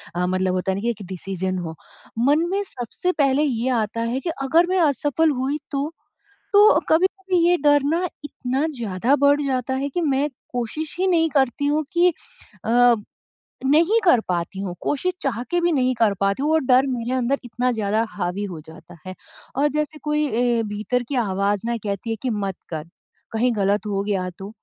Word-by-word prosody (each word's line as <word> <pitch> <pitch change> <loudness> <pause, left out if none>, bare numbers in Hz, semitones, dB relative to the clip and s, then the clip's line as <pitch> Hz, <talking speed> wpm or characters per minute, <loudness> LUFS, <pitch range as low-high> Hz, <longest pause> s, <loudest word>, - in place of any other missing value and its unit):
अ, 180 +1 0
मतलब 185 0 0
होता 185 +1 0
है - - -1
ना - - -4
कि 235 - 0
एक 210 -3 -4
डिसीजन 185 0 -3
हो 160 - -7 0.5
मन 310 +4 +3
में 395 +1 +1
सबसे 245 +9 -3
पहले 275 +1 +3
ये 255 -3 0
आता 215 +2 -4
है 265 - 0
कि 340 - -4
अगर 320 +6 +4
मैं 375 - +2
असफल 290 +3 +1
हुई 280 +4 -1
तो? 285 +2 -1 0.6
तो, 415 +1 +7
कभी-कभी 375 +2 +2
ये 355 - +5
डरना 295 +4 +3 0.2
इतना 270 0 -2
ज़्यादा 230 +4 +1
बढ़ 285 +1 +5
जाता 260 -1 -1
है 275 +2 -2
कि 350 +6 -2
मैं 285 -2 +1 0.2
कोशिश 275 +6 -4
ही 380 - +2
नहीं 330 -3 +3
करती 275 -1 +1
हूँ 300 +2 +1
कि 350 +1 +5 0.6
अ, 240 +1 +5 0.7
नहीं 330 +11 +4
कर 345 - +5
पाती 180 +2 -2
हूँ 185 -3 -4
कोशिश 360 +6 -1
चाह 240 -4 -1
के 350 - +2
भी 345 0 +2
नहीं 255 -4 +2
कर 225 -3 +3
पाती 200 +6 0
हूँ 300 - +1
और 320 - +4
डर 255 +1 +5
मेरे 245 -2 -2
अंदर 260 +2 0
इतना 250 +1 -1
ज़्यादा 215 -1 0
हावी 195 0 -3
हो 165 - -7
जाता 160 +1 -13
है 185 - -6 0.4
और 285 +2 +3
जैसे 300 +1 -2
कोई 300 0 +1
ए, 240 -1 +1
भीतर 215 +4 -2
की 280 - -2
आवाज़ 200 +2 0
ना 235 0 0
कहती 200 +2 -3
है 225 - 0
कि 260 - -1
मत 200 -4 -2
कर, 160 -1 -5 0.4
कहीं 235 +3 +1
गलत 200 +1 +1
हो 200 -1 -1
गया 195 -3 -1
तो? 195 +1 -7
250 Hz, 195 wpm, -22 LUFS, 205-295 Hz, 0.7 s, तो